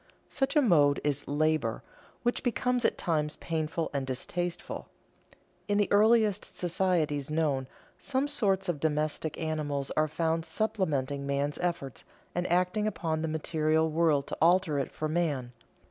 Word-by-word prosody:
Such 270 +3 -1
a 295 - +5
mode 145 - +4
is 145 -1 -1
"labor," 150 -5 0 0.4
which 240 0 0
becomes 250 0 0
at - - +2
times 150 -3 0
painful 160 0 -2
and 135 -2 -2
distasteful. 175 +7 -3 0.8
In 205 -1 +1
the 205 - +1
earliest 215 -1 +4
societies 170 -5 0
known, 150 -4 0 0.3
some 270 +1 -1
sorts 200 -9 +1
of 170 -5 -1
domestic 155 0 -1
animals 150 -3 -2
are 155 0 +2
found 165 +1 0
supplementing 160 -7 -1
man's 140 +1 -1
efforts 170 -7 -3 0.3
and 175 0 -2
acting 180 +4 +2
upon 160 -6 -2
the 160 - -1
material 160 0 +1
world 155 -3 +2
to - - -6
alter 170 -3 +4
it 135 - -3
for 155 - -3
man. 150 -6 -1
160 Hz, 145 wpm, -29 LUFS, 150-185 Hz, 0.8 s, a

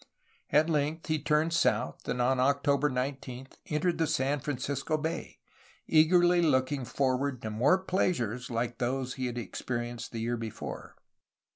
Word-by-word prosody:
At 150 +2 +4
length, 155 0 0
he 155 -1 +1
turned 155 +2 +2
south 170 - +1
and 125 - -1
on 125 +1 +2
October 140 +2 +2
19 130 0 -4 0.2
entered 160 +1 0
San 140 +2 +1
Francisco 140 +2 -2
Bay, 160 +2 -4 0.5
eagerly 175 +2 +5
looking 135 -3 +1
for 130 +2 +1
ward 135 -1 -2
to 110 - -3
more 130 - +4
pleasures 155 - -1
like 120 0 -2
those 130 +1 -1
he 130 -1 -3
had 120 0 -5
experienced 120 +1 -4
the 115 - -4
year 120 +1 -1
before. 115 -2 -7
135 Hz, 145 wpm, -30 LUFS, 125-155 Hz, 0.5 s, eagerly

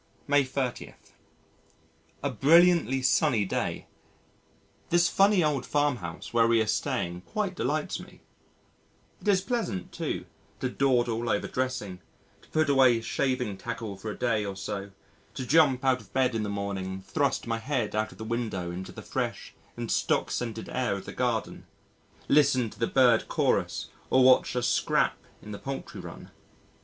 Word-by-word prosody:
May 145 -1 +4
30. 130 -1 -4 1.3
A 140 - +1
brilliantly 155 - +4
sunny 130 -5 +3
day. - - -2 1.0
This 175 0 +4
funny 195 -1 +4
old 145 -4 0
farm 145 -2 +1
house 85 0 -8
where 115 -1 +4
we 115 0 +4
are 110 - +2
staying 105 -5 -2
quite 205 - -3
delights 155 0 -2
me. - - -13 1.0
It - - -9
is 195 -2 +4
pleasant, 195 - -3
too, - - -3 0.3
to 130 - -1
dawdle 120 -4 +1
over 105 - 0
dressing, 125 -8 -3 0.4
to - - -22
put 155 -1 +1
away 130 -4 +5
shaving 125 -3 -1
tackle 115 -4 -5
for 95 +3 -7
a - - -6
day 115 -4 +1
or 100 -1 -4
so, 100 +1 -5 0.5
to 130 - -4
jump 135 -2 +4
out 130 -1 +3
of - - -19
bed 130 -2 +2
in 115 - -1
the 105 - -2
morning 100 -2 -3
and 95 0 -7
thrust 140 +1 0
my 115 -1 -2
head 125 -3 -2
out 110 0 0
of - - -15
the - - -7
window 110 -6 -3
into 90 +1 -6
the - - -10
fresh - - -4 0.2
and - - -4
stock - - +1
scented 115 -2 -3
air 125 -6 -1
of 100 - -7
the - - -7
garden, 120 -3 -2 0.6
listen 135 -6 +3
to - - -15
the 115 - +1
bird 125 -4 +4
chorus - - 0 0.2
or 130 - +5
watch 130 0 +5
a 125 - 0
"scrap" - - +1 0.2
in 105 - -9
the 100 - -6
poultry 135 0 -6
run. - - -10
125 Hz, 170 wpm, -28 LUFS, 105-140 Hz, 1.3 s, away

